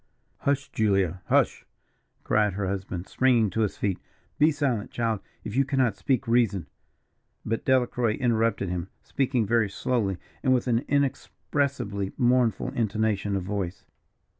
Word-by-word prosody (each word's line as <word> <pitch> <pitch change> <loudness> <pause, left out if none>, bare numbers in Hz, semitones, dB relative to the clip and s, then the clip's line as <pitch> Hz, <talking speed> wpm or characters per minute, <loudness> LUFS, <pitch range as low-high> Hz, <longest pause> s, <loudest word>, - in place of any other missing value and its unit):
"Hush, 140 -1 0
Julia, 95 -5 +1
hush!" - - +2 0.6
cried 105 -2 +2
her 100 +1 -2
husband, 95 -1 -4
springing 120 -6 +3
to 110 - -1
his 105 - -1
feet. 100 -3 -1 0.4
"Be 150 +2 +6
silent, 135 -8 -1
child, 115 -3 -1 0.2
if 105 - -6
you 135 - +4
cannot 130 -5 +1
speak 135 +3 0
reason 115 -7 +2 0.4
" - - -46
But 115 +1 -2
Delacroix 125 -3 +2
interrupted 115 -5 +1
him, 90 +1 -3
speaking 130 -4 0
very 115 0 +2
slowly, 100 -2 -1 0.2
and 130 -2 +3
with 125 - 0
an 120 -2 +2
inexpressibly 135 -6 -1
mournful 125 -4 +2
intonation 105 -3 0
of 95 - -1
voice. 95 -2 -4
115 Hz, 140 wpm, -26 LUFS, 100-130 Hz, 0.6 s, Be